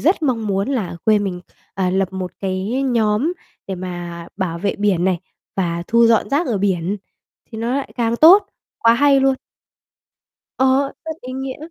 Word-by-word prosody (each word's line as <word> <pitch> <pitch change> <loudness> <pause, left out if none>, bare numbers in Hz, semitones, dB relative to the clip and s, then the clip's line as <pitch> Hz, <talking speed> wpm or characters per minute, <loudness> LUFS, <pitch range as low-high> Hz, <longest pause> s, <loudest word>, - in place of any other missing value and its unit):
rất 340 +2 +2
mong 235 -7 0
muốn 195 +2 0
là 215 -11 -2
quê 215 -1 +4
mình, 190 -3 -3 0.3
à, 185 -2 0
lập 190 0 0
một 185 -2 -4
cái 195 +7 -1
nhóm 235 +3 +1 0.3
để 190 - -3
mà 175 -2 -6
bảo 180 -4 -2
vệ 200 +2 -1
biển 200 -4 +1
này, 185 -2 +1 0.4
và 170 -2 -1
thu 235 0 +4
dọn 230 +3 +3
rác 295 +5 +1
ở 225 -5 0
biển, 190 0 0 0.5
thì 220 - -7
nó 235 +3 -1
lại 280 - -3
càng 235 -1 0
tốt, 380 +8 +7 0.3
quá 230 0 +5
hay 275 +2 +4
luôn. 270 0 +3 1.2
Ờ, 265 +1 +3
rất 320 0 -6
ý 255 +1 -7
nghĩa. 265 0 -5
215 Hz, 180 wpm, -20 LUFS, 185-265 Hz, 1.2 s, tốt